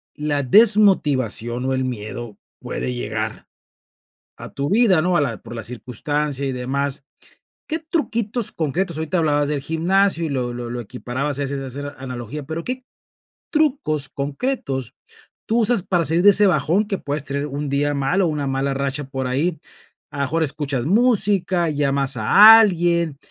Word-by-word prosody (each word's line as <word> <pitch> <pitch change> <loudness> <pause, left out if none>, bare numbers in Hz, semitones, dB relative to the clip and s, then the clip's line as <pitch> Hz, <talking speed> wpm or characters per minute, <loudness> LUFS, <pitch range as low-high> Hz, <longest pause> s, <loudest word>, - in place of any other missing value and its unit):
la 145 -1 -1
desmotivación 140 - +3
o 130 - 0
el 130 0 0
miedo 120 -2 -5 0.2
puede 65 +1 -3
llegar - - -4 0.9
a - - -9
tu 140 +1 -3
vida, 205 -5 +4
¿no? 180 +1 +1
A - - +2
la 120 -6 -2
por 115 +1 -10
la 115 - -6
circunstancia 140 +4 -3
y 135 - -1
demás. 135 +2 -2 0.6
¿Qué 320 +1 -2
truquitos 240 -8 -2
concretos? 170 +2 -2
Ahorita 160 +3 -1
hablabas 145 -2 +1
del 145 -2 -2
gimnasio 170 +3 +1
y - - -3
lo 125 -3 -2
lo 120 0 -6
lo 120 0 -4
equiparabas 130 +5 -4
a - - 0
veces 140 0 -3
a 135 - -6
hacer 145 +2 -7
analogía, 130 +2 -7
pero, 160 +4 -5
¿qué 255 +1 -4 0.7
trucos 275 - 0
concretos 140 - -3 0.5
tú 230 +2 +1
usas 230 -3 +1
para 175 -2 0
salir 165 +3 +1
de 205 - +8
ese 205 +1 +4
bajón 175 +5 +1
que 195 - -2
puedes 145 +1 -4
tener 140 0 -2
un 145 0 -4
día 145 +1 0
mal 140 +7 0
o - - +2
una 150 -3 -2
mala 135 +1 -1
racha 140 +1 -2
por 135 -1 -3
ahí? 150 +6 -1 0.5
A - - -9
lo - - +1
mejor 160 +4 0
escuchas 140 -4 -2
música, 195 -4 +2
llamas 140 -2 0
a 210 - +8
alguien, 170 -6 +1
145 Hz, 170 wpm, -21 LUFS, 135-180 Hz, 0.9 s, de